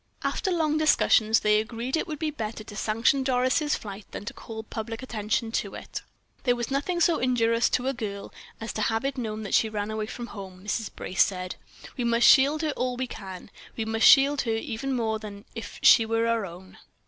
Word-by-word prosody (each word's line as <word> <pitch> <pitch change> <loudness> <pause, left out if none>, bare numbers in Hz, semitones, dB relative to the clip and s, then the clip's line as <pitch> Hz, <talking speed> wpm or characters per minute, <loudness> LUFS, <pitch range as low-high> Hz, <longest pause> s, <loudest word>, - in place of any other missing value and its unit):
After 395 - -1
long 315 -4 +1
discussions, 225 -7 +4
they 210 0 +4
agreed 235 +4 -3
it 320 - -1
would 310 -3 -4
be 315 -1 -2
better 220 -5 -5
to 210 -1 -11
sanction 230 +6 +2
Doris' 260 +4 +1
flight 200 -1 -8
than - - -7
to - - -5
call 220 -1 -8
public 225 +2 -6
attention 225 -1 -2
to - - -9
it. - - -7 0.4
"There 245 -2 +3
was 240 +2 -4
nothing 290 +6 -1
so 340 -1 +3
injurious 230 -2 +2
to 255 +1 0
a 270 - +1
girl 200 -5 -6 0.3
as 225 - -5
to 215 - -3
have 225 +3 0
it 275 0 -1
known 220 -4 -4
that 200 - -5
she 220 - +4
ran 210 0 -3
away 215 -1 -3
from 240 +1 -6
home," 190 -3 -9
Mrs. 215 +1 -2
Brace 190 - +2
said. 185 -2 -4 0.4
"We 250 - -1
must 235 0 +3
shield 290 +3 +6
her 310 - +1
all 250 -2 -2
we 260 - -1
can. 195 -5 -9 0.3
We 225 - -1
must 225 0 +3
shield 280 +1 +6
her 225 -2 -1
even 230 +4 -3
more 220 -2 -1
than 205 -1 -9
if 225 -2 -7
she 225 - +7
were 225 0 +1
our 230 -3 0
own." 180 +2 -13
225 Hz, 215 wpm, -26 LUFS, 215-260 Hz, 0.4 s, she